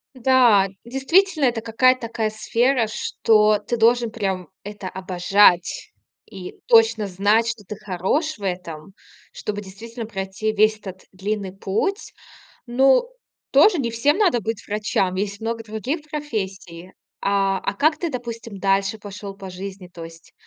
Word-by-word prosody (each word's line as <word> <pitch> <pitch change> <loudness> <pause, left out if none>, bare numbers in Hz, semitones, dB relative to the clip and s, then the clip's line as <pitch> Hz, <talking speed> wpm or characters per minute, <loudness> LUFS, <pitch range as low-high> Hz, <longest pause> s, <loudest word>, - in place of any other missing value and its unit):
Да, 240 -6 +4 0.2
действительно, 310 +7 +2
это 240 -3 +1
какая-то 250 +3 +2
такая 220 -2 -2
сфера, 235 +2 +1
что 215 -1 +2
ты 225 +3 -3
должен 235 +1 +3
прям 195 -5 -3 0.2
это 205 -2 -7
обожать, 185 0 +2 0.3
и 190 -4 -10
точно 225 -2 +4
знать, 205 +5 +2
что 230 -4 -5
ты 210 - -7
хорош 210 - -2
в 205 - -15
этом, 180 -2 -5 0.4
чтобы 205 -1 -5
действительно 225 +4 -8
пройти 195 +1 -3
весь 215 +1 +3
этот 190 -3 -10
длинный 195 0 -4
путь. 305 - -2 0.5
Ну, 265 - +3 0.4
тоже 330 +7 +5
не 235 -5 -1
всем 285 - +1
надо 350 - +3
быть 220 +1 -5
врачам. 205 -3 -1
Есть 200 +2 -3
много 225 0 -3
других 220 - -4
профессий. 190 - -5 0.3
А, 195 -1 +1
а - - -3
как 305 +6 +2
ты, 340 - -2
допустим, 230 -5 -7
дальше 195 +2 +1
пошел 205 -1 -8
по 195 -1 -9
жизни? 190 0 -8
То 170 -2 -10
есть 165 0 -14
215 Hz, 145 wpm, -22 LUFS, 195-235 Hz, 0.5 s, тоже